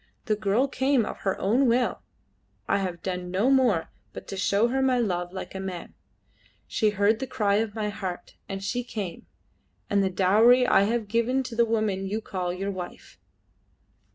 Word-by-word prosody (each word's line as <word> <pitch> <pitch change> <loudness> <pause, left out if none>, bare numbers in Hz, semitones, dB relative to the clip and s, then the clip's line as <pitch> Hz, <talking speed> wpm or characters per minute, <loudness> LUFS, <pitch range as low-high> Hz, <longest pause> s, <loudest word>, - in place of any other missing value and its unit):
The 215 - +1
girl 215 +5 +1
came 265 -3 +1
of - - -6
her 195 - -1
own 240 +7 +2
will. 245 +1 +1 0.7
I - - +2
have 180 -3 -4
done 180 -1 -3
no 200 +9 +2
more 245 -11 +2 0.2
but - - -9
to - - -4
show 200 +4 +2
her 265 +2 0
my 260 -1 +3
love 180 -6 -1
like 185 - -7
a 190 - -5
man; 190 -2 -6 0.7
she 215 - +1
heard 205 +2 +2
the 265 - -3
cry 205 -4 +1
of 220 -1 -1
my 215 -1 -1
heart, 190 -3 -6 0.2
and 195 0 -5
she 245 +6 -2
came, 205 -8 -6 0.6
and 200 -1 +3
the 190 - +1
dowry 215 +7 +5
I 200 - +4
have 225 0 -1
given 235 +5 +1
to 245 -2 -7
the 235 +1 +4
woman 215 -4 -1
you 210 +3 -2
call 185 -5 -3
your 195 +3 -3
wife." 185 -2 -9
205 Hz, 185 wpm, -26 LUFS, 190-235 Hz, 0.7 s, dowry